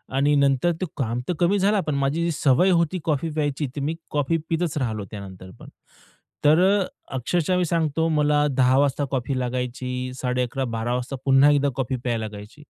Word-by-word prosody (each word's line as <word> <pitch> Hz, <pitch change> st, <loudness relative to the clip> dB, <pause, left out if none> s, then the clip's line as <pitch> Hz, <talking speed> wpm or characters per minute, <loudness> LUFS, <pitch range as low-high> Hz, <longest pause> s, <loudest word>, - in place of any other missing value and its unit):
आणि 145 Hz, +2 st, +3 dB
नंतर 140 Hz, +4 st, +3 dB
ते -, -, +1 dB
काम 120 Hz, -3 st, -1 dB
तर -, -, +2 dB
कमी 185 Hz, +4 st, +3 dB
झाला, 205 Hz, +2 st, +2 dB
पण 150 Hz, -3 st, -2 dB
माझी 140 Hz, +4 st, 0 dB
जी 170 Hz, -, 0 dB
सवय 150 Hz, +5 st, +3 dB
होती 170 Hz, +1 st, +1 dB
कॉफी 155 Hz, +1 st, 0 dB
प्यायची, 145 Hz, -2 st, -1 dB
तर 140 Hz, -, -3 dB
मी 155 Hz, +4 st, -1 dB, 0.2 s
कॉफी 150 Hz, +3 st, +1 dB
पीतच 165 Hz, -2 st, -1 dB
राहिलो 110 Hz, -5 st, -2 dB
त्यानंतर 95 Hz, -3 st, -9 dB
पण. -, -, -12 dB, 0.8 s
तर 155 Hz, +3 st, +6 dB, 0.2 s
अ, -, -, 0 dB, 0.3 s
अक्षरशः 175 Hz, +7 st, 0 dB
मी 180 Hz, -, +1 dB
सांगतो 160 Hz, -1 st, 0 dB
मला 150 Hz, -1 st, +2 dB
10:00 130 Hz, 0 st, +4 dB
वाजता 145 Hz, 0 st, +1 dB
कॉफी 130 Hz, 0 st, -1 dB
लागायची, 125 Hz, 0 st, -3 dB
11:30-12:00 125 Hz, -2 st, -2 dB
वाजता 125 Hz, +2 st, -4 dB
पुन्हा 135 Hz, +2 st, +6 dB
एकदा 145 Hz, -1 st, +2 dB
कॉफी 130 Hz, -1 st, -2 dB
प्यायला 115 Hz, -3 st, -1 dB
लागायची. 105 Hz, +2 st, -10 dB
140 Hz, 180 wpm, -23 LUFS, 125-160 Hz, 0.8 s, तर